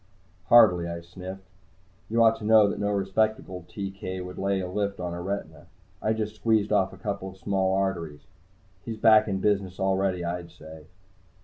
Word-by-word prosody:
"Hardly," 90 -8 +6
I 85 0 -5
sniffed. 95 +2 -10 0.6
"You 115 +1 +3
ought 115 0 +5
to - - -11
know 110 -1 +6
that - - -3
no 105 - 0
respectable 100 -2 -1
TK 95 -2 -5
would 90 0 -8
lay 100 0 0
a 90 - -3
lift 100 +1 -2
on 90 -1 -4
a 85 - -5
retina. 85 -4 -5 0.3
I 110 - +1
just 110 -1 -3
squeezed 110 -2 +1
off 95 -2 +2
a 95 - -12
couple 100 0 -4
of 95 - -14
small 95 0 0
arteries. 85 -6 -2 0.6
He's 115 -2 -6
back 110 0 +5
in 95 -2 -2
business 100 -3 0
already, 95 -2 0
I'd 85 0 -4
say." 80 0 -13
95 Hz, 180 wpm, -26 LUFS, 90-105 Hz, 0.6 s, Hardly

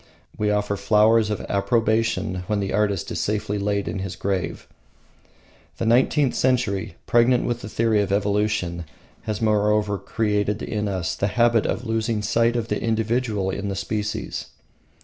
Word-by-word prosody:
We 105 0 0
offer 105 -1 0
flowers 105 +2 +4
of 105 - -2
approbation 110 -1 +1
when 105 -1 0
the 100 -1 -2
artist 100 -2 0
is - - -2
safely 105 0 -1
laid 100 0 -1
in 95 - -3
his 95 -1 -4
grave. 95 -4 -3 1.1
The - - -2
nineteenth 130 +4 +3
century, 120 -9 0
pregnant 120 +1 +3
with 120 0 -2
the 105 - -7
theory 110 -1 +2
of 100 - -2
evolution, 100 -4 0 0.4
has 110 0 -3
moreover 105 -1 +2
created 105 -1 -1
in 105 -1 -2
us 95 -4 -2
the 100 - -1
habit 115 0 +2
of 125 - -2
losing 110 -1 -1
sight 115 +2 +2
of 115 -2 -1
the - - -2
individual 110 -3 0
in 100 +1 -3
the 95 - -3
species. 105 +2 -3
105 Hz, 155 wpm, -23 LUFS, 100-115 Hz, 1.1 s, flowers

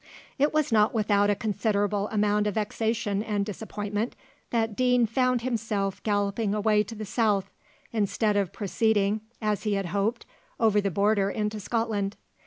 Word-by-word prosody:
It 290 +2 +3
was 305 -4 +1
not 215 +1 +3
without 205 -2 +3
a 205 - +3
considerable 205 -1 0
amount 210 -1 +1
of 205 - -2
vexation 215 -1 -1
and 205 -2 -1
disappointment 210 +1 -4 0.3
that 225 -2 0
Deane 250 0 +3
found 250 +1 +1
himself 215 -5 -2
galloping 205 0 0
away 210 0 +3
to 225 - -8
the 215 0 -5
south, 210 -3 +1 0.4
instead 210 0 +1
of 200 -4 +1
proceeding, 210 0 +1 0.2
as 210 -1 0
he 210 -2 -1
had 195 -1 -1
hoped, 200 +6 -1 0.3
over 215 -2 +4
the 200 - 0
border 200 +2 +2
into 210 0 -2
Scotland. 210 -2 -1
210 Hz, 155 wpm, -27 LUFS, 205-225 Hz, 0.4 s, over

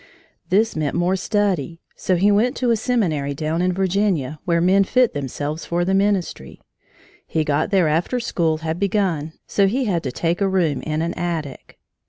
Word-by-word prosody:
This 220 +4 +2
meant 155 -2 -1
more 180 +2 +1
study. 190 - -1 0.2
So 185 - 0
he 200 +4 +3
went 230 +6 +2
to 245 -2 +1
a - - +4
seminary 175 - -1
down 155 +3 -1
in 180 0 +2
Virginia, 185 -6 0
where 170 -1 +2
men 190 +3 +4
fit 250 +4 +2
themselves 145 +3 -4
for 175 +1 -1
the 190 - 0
ministry. 195 - -1 0.7
He 160 - 0
got 150 0 0
there 190 -5 +3
after 170 +11 0
school 165 -9 0
had 160 +1 -4
begun, 185 -6 0
so 200 -1 +2
he 255 +6 0
had 180 -6 0
to 130 - -4
take 170 +7 -1
a 195 - +2
room 170 -7 +1
in 155 +1 -2
an 170 - -2
attic. 165 -6 -5
175 Hz, 185 wpm, -21 LUFS, 155-200 Hz, 0.7 s, a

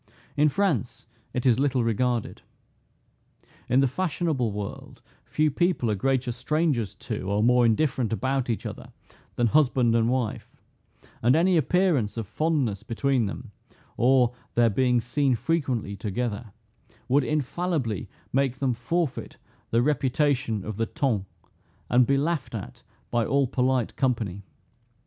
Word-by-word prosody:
In 150 +1 +4
France 175 - -1 0.3
it 125 - -3
is 125 -2 +4
little 135 -3 +1
regarded. 115 +1 -1 1.3
In 130 +3 +4
the 135 - +4
fashionable 150 - -1
world, 120 +5 -7 0.2
few 155 0 +1
people 175 -7 +1
are - - +1
greater 130 +3 0
strangers 125 - -1
to, 105 -2 -5
or 100 +1 +1
more 125 0 +5
indifferent 125 -1 +1
about 130 +2 -1
each 115 - -2
other, - - -8 0.4
than 120 - +2
husband 125 -3 +3
and 115 0 +3
wife; 125 -4 -3 0.6
and 120 +3 +4
any 175 +3 +3
appearance 160 - +2
of 115 - -2
fondness 130 -4 -1
between 120 +1 0
them, 110 +2 -7 0.4
or 125 -1 +3 0.2
their 120 -1 +4
being 125 +3 +2
seen 135 +2 +1
frequently 130 -5 -1
together, 110 +2 -3 0.6
would 140 +2 +3
infallibly 150 - -2 0.2
make 135 -1 +1
them 135 -2 0
forfeit 145 +6 -2 0.3
the 115 +1 +2
reputation 130 -5 0
of 110 -2 -5
the 115 - 0
ton, 110 -9 -1 0.6
and 120 0 +5
be 140 - +3
laughed 145 -4 -1
at 115 +3 -7 0.3
by 120 -1 +2
all 140 +4 +2
polite 125 -1 0
company. 110 -7 -1
125 Hz, 135 wpm, -26 LUFS, 115-140 Hz, 1.3 s, more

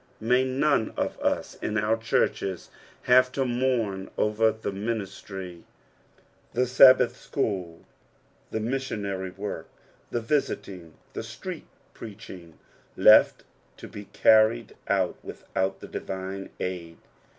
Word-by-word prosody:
Hay 125 +3 +3
none 130 -2 +1
of - - -2
us - - -1
in 105 - -2
our 110 +1 +2
churches 105 -4 -1 0.3
have 125 +1 +5
to 135 0 0
mourn 120 -6 -1
over 110 +1 +2
the 110 -2 -5
minbtry, 95 -4 -5 0.9
the 125 +1 +2
Sabbath 125 -1 +6
school, 95 -13 -3 0.6
the 110 - -3
missionary 105 -6 -3
work, 100 +3 -6 0.4
the 120 - -1
visiting, 100 - -3 0.2
the - - -4
street - - -8 0.3
preaching, 95 -6 -11 0.4
left - - +6 0.3
to - - -10
be 100 0 -10 0.2
earned 110 +1 +5
out 95 -3 +1
without 95 +1 -3
the - - -8
divme 95 +1 -6
aid. 85 -3 -5
105 Hz, 115 wpm, -26 LUFS, 95-120 Hz, 0.9 s, Sabbath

